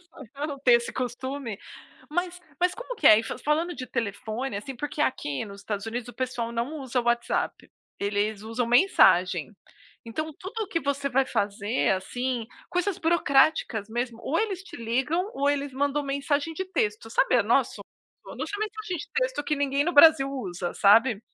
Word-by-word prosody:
Só 350 -2 -14
pra 285 +2 -4
não 285 -2 -6
ter 265 -2 +4
esse 235 0 +2
costume. 255 -2 -4 0.5
Mas 355 +2 -2 0.2
mas 360 0 +2
como - - -7
que - - +1
é 215 +1 +8
fa 225 - -5
falando 315 +6 0
de 255 - -6
telefone, 225 +1 -3
assim. 235 +7 -6
Porque 295 +3 -3
aqui 145 - -1
nos 200 -1 -10
Estados 205 0 -4
Unidos 235 +1 -4
o 245 - -10
pessoal 245 -2 -3
não 235 +6 -3
usa 260 -2 -2
o - - -8
WhatsApp, 240 0 -1 0.3
eles 205 +1 -1
usam 230 +2 -2
mensagem. 195 - +4 0.5
Então 310 +8 -4
tudo 390 +5 -6
o - - -4
que 335 -4 -1
você 280 -1 -1
vai 265 +1 +2
fazer, 205 +1 0
assim, 240 +5 -2 0.2
coisas 360 +1 0
burocráticas 285 -8 +2
mesmo, 240 0 -3
ou 320 - 0
eles 400 -4 -1
te - - -10
ligam, 265 - -1
ou 280 +1 +2
eles 285 -1 -2
mandam 285 +2 0
mensagem 285 +3 -1
de 380 - -3
texto. 215 +2 -1
Sabe, 250 - +3
a 235 - +4
nosso 235 +4 +1 0.4
mandam - - -6
só 410 - -5
mensagem 430 -3 -4
de - - -8
texto - - 0
que 300 - 0
ninguém 280 0 +1
no 350 - 0
Brasil 295 -2 +7
usa, 185 -9 -4
sabe. 220 +2 +5
260 Hz, 185 wpm, -26 LUFS, 225-310 Hz, 0.5 s, é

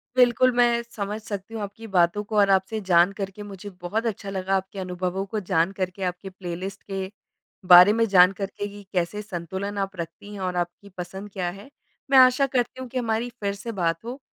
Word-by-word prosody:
बिल्कुल, 250 0 +5
मैं 240 -1 +4
समझ 210 -2 -5
सकती 205 +1 -6
हूँ 220 - -4
आपकी 215 +3 -8
बातों 175 +4 +3
को 215 0 -3
और 200 -1 +5
आपसे 195 +3 +2
जान 175 +2 +6
करके 200 +1 -6
मुझे 205 0 -8
बहुत 215 +6 -2
अच्छा 205 -2 -3
लगा, 190 0 -1
आपके 190 +1 -3
अनुभवों 185 +1 -3
को 215 +2 -3
जान 175 -2 +1
करके, 185 +1 -3
आपके 180 +2 -3
प्लेलिस्ट 185 +2 -6
के 190 0 -3 0.6
बारे 180 +4 +10
में 230 0 +3
जान 185 -1 +7
करके 200 +1 -4
कि 205 0 -11
कैसे 180 +4 -1
संतुलन 195 +1 -5
आप 195 -1 -2
रखती 170 +5 -7
हैं 195 - -7
और 180 -1 -2
आपकी 175 +3 -4
पसंद 190 +3 -6
क्या 180 -2 -2
है। 200 +8 -11 0.4
मैं 270 - +7
आशा 255 +2 +6
करती 255 0 -1
हूँ 255 - -6
कि 255 - -5
हमारी 230 0 -1
फिर 200 -1 0
से 230 +3 -6
बात 165 +3 0
हो। 255 +4 -6
200 Hz, 205 wpm, -25 LUFS, 185-220 Hz, 0.6 s, बारे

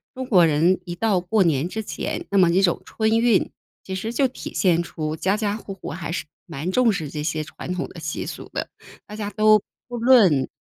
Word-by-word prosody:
中 260 0 -4
国 190 -8 +5
人 165 +5 +3
一 175 - -5
到 200 -1 +1
过 190 +3 +2
年 160 -1 +1
之 220 +3 -4
前， - - -4
那 200 - +3
么 175 -2 +5
这 185 +3 +3
种 175 -3 +2
春 220 - -1
运 230 -4 +3 0.3
其 190 - -6
实 210 +5 -3
就 265 +3 +2
体 255 - -8
现 175 -3 +2
出 155 -2 -4
家 190 +6 0
家 210 -2 -1
户 205 -2 -8
户 190 - -7
还 165 +1 -5
是 170 - -3 0.2
蛮 165 +2 -4
重 240 +2 +3
视 170 -7 -3
这 150 +1 -5
些 155 0 -2
传 160 - -8
统 180 - -3
的 170 - -11
习 155 -1 -4
俗 - - -8
的， - - -3 0.4
大 210 - -9
家 210 -1 -4
都 215 -1 +4 0.3
不 245 -1 -6
论 215 - +5
190 Hz, 245 characters per minute, -23 LUFS, 165-215 Hz, 0.4 s, 国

